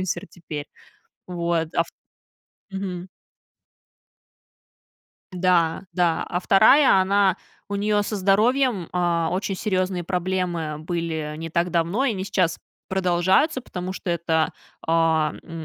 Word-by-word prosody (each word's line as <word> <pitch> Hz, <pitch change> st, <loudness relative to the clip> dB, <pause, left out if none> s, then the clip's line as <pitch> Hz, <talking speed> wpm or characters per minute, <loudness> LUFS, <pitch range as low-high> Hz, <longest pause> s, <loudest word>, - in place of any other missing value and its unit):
инфлюенсер 185 Hz, +1 st, -3 dB
теперь. 150 Hz, -4 st, -7 dB, 0.6 s
Вот, 170 Hz, -2 st, -1 dB
а -, -, +3 dB
вт -, -, -17 dB, 0.8 s
Мгм. 190 Hz, -2 st, -5 dB, 2.2 s
Да, 180 Hz, -1 st, +1 dB
да, 175 Hz, -2 st, +1 dB
а 175 Hz, -, -1 dB
вторая, 215 Hz, +4 st, +6 dB
она, 195 Hz, -1 st, +3 dB, 0.3 s
у 200 Hz, -, -3 dB
нее 205 Hz, +1 st, +1 dB
со 210 Hz, +1 st, -3 dB
здоровьем, 210 Hz, +1 st, +2 dB
а, 170 Hz, -2 st, +1 dB
очень 195 Hz, +2 st, -1 dB
серьезные 185 Hz, -3 st, -1 dB
проблемы 180 Hz, -3 st, -2 dB
были 160 Hz, -2 st, -3 dB
не 165 Hz, 0 st, -5 dB
так 170 Hz, +2 st, 0 dB
давно, 175 Hz, +9 st, +1 dB
и 275 Hz, -, +2 dB
они 190 Hz, -1 st, -4 dB
сейчас 185 Hz, -4 st, 0 dB, 0.3 s
продолжаются, 190 Hz, -, +2 dB
потому 185 Hz, -2 st, -6 dB
что 180 Hz, -, -4 dB
это, 165 Hz, -1 st, 0 dB, 0.3 s
а, 160 Hz, -1 st, +2 dB
м, 165 Hz, -1 st, -8 dB
180 Hz, 125 wpm, -23 LUFS, 165-195 Hz, 2.2 s, вторая